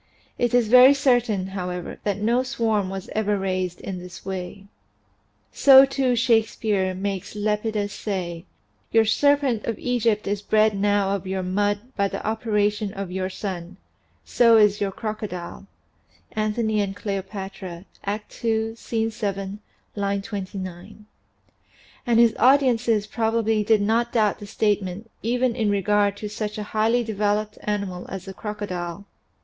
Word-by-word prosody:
It 240 Hz, 0 st, +2 dB
is 240 Hz, -3 st, +3 dB
very 255 Hz, +4 st, +8 dB
certain, 240 Hz, -8 st, +1 dB
however, 180 Hz, -2 st, -5 dB
that 200 Hz, -2 st, 0 dB
no 230 Hz, +4 st, +2 dB
swarm 225 Hz, -6 st, 0 dB
was 190 Hz, -1 st, -6 dB
ever 210 Hz, -1 st, 0 dB
raised 185 Hz, -2 st, -2 dB
in 185 Hz, -2 st, -5 dB
this 180 Hz, 0 st, -11 dB
way. 190 Hz, +1 st, -6 dB, 0.9 s
So 270 Hz, -1 st, +8 dB
too 270 Hz, -2 st, 0 dB
Shakespeare 220 Hz, -5 st, +1 dB
makes 195 Hz, +1 st, -4 dB
Lepidus 210 Hz, 0 st, -1 dB
say: 175 Hz, -4 st, -4 dB, 0.5 s
"Your 225 Hz, -1 st, +4 dB
serpent 280 Hz, -1 st, +2 dB
of 230 Hz, -, -2 dB
Egypt 230 Hz, -4 st, 0 dB
is 200 Hz, 0 st, -2 dB
bred 215 Hz, 0 st, +3 dB
now 200 Hz, 0 st, +1 dB
of 190 Hz, -1 st, -6 dB
your 190 Hz, 0 st, -2 dB
mud 205 Hz, +2 st, 0 dB
by 200 Hz, -1 st, +1 dB
the -, -, -6 dB
operation 210 Hz, -2 st, 0 dB
of 195 Hz, -2 st, -5 dB
your 185 Hz, 0 st, -2 dB
sun; 185 Hz, -2 st, -6 dB, 0.5 s
so 230 Hz, -2 st, +5 dB
is 210 Hz, -1 st, +4 dB
your 200 Hz, -1 st, 0 dB
crocodile" 200 Hz, -3 st, -6 dB, 0.6 s
("Antony 215 Hz, 0 st, 0 dB
and 195 Hz, -1 st, -3 dB
Cleopatra," 195 Hz, -3 st, -6 dB, 0.2 s
Act 210 Hz, +4 st, -5 dB
II, 225 Hz, -1 st, 0 dB
Scene 225 Hz, -1 st, -2 dB
7, 200 Hz, -2 st, -4 dB, 0.4 s
line 200 Hz, -1 st, -1 dB
29). 195 Hz, -1 st, -7 dB, 1.0 s
And 235 Hz, -1 st, +4 dB
his 235 Hz, -2 st, +6 dB
audiences 240 Hz, -4 st, +4 dB
probably 225 Hz, -1 st, 0 dB
did 215 Hz, -1 st, +3 dB
not 230 Hz, +3 st, +1 dB
doubt 215 Hz, -4 st, +2 dB
the 205 Hz, -, -9 dB
state 210 Hz, 0 st, +1 dB
ment 195 Hz, +4 st, -7 dB
even 245 Hz, +1 st, 0 dB
in 220 Hz, -4 st, 0 dB
regard 205 Hz, 0 st, +2 dB
to 210 Hz, -, -5 dB
such 210 Hz, +1 st, -4 dB
a 210 Hz, -, -3 dB
highly 225 Hz, +3 st, +2 dB
developed 210 Hz, -1 st, -1 dB
animal 200 Hz, -4 st, -3 dB
as 195 Hz, -1 st, -6 dB
the 195 Hz, -, -7 dB
crocodile. 195 Hz, -3 st, -5 dB
210 Hz, 145 wpm, -24 LUFS, 195-225 Hz, 1.0 s, very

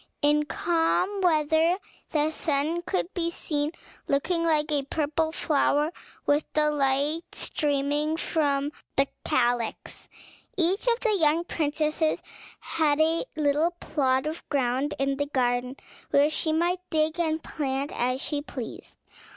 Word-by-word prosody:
In 295 Hz, +1 st, +4 dB
calm 345 Hz, +5 st, +1 dB
weather 320 Hz, 0 st, +3 dB, 0.3 s
the 305 Hz, 0 st, +1 dB
sun 310 Hz, +2 st, 0 dB
could 365 Hz, +1 st, -2 dB
be 335 Hz, -2 st, 0 dB
seen, 300 Hz, -3 st, -2 dB, 0.4 s
looking 335 Hz, +5 st, +1 dB
like 310 Hz, -2 st, +2 dB
a 290 Hz, -1 st, +2 dB
purple 310 Hz, +3 st, -1 dB
flower, 300 Hz, 0 st, +1 dB, 0.3 s
with 290 Hz, +1 st, +3 dB
the 300 Hz, 0 st, +3 dB
light 285 Hz, +2 st, +1 dB
streaming 295 Hz, +2 st, 0 dB
from 290 Hz, -4 st, 0 dB, 0.2 s
the 275 Hz, 0 st, +3 dB, 0.2 s
calyx. 240 Hz, -1 st, -1 dB, 0.5 s
Each 370 Hz, +6 st, +1 dB
of 475 Hz, 0 st, +2 dB
the 445 Hz, -4 st, +2 dB
young 325 Hz, -2 st, +3 dB
princesses 310 Hz, -1 st, 0 dB, 0.4 s
had 305 Hz, -2 st, +1 dB
a 320 Hz, +4 st, +2 dB
little 300 Hz, +2 st, +2 dB
plot 265 Hz, -3 st, +1 dB
of 315 Hz, +2 st, -5 dB
ground 270 Hz, +1 st, 0 dB
in 275 Hz, 0 st, 0 dB
the 285 Hz, 0 st, -1 dB
garden, 250 Hz, -1 st, 0 dB, 0.3 s
where 285 Hz, +2 st, +4 dB
she 315 Hz, 0 st, 0 dB
might 345 Hz, +3 st, +1 dB
dig 315 Hz, +1 st, +1 dB
and 320 Hz, -2 st, 0 dB
plant 275 Hz, -1 st, -2 dB
as 255 Hz, +2 st, 0 dB
she 290 Hz, +1 st, -2 dB
pleased. 260 Hz, -5 st, -8 dB
300 Hz, 135 wpm, -27 LUFS, 280-325 Hz, 0.5 s, In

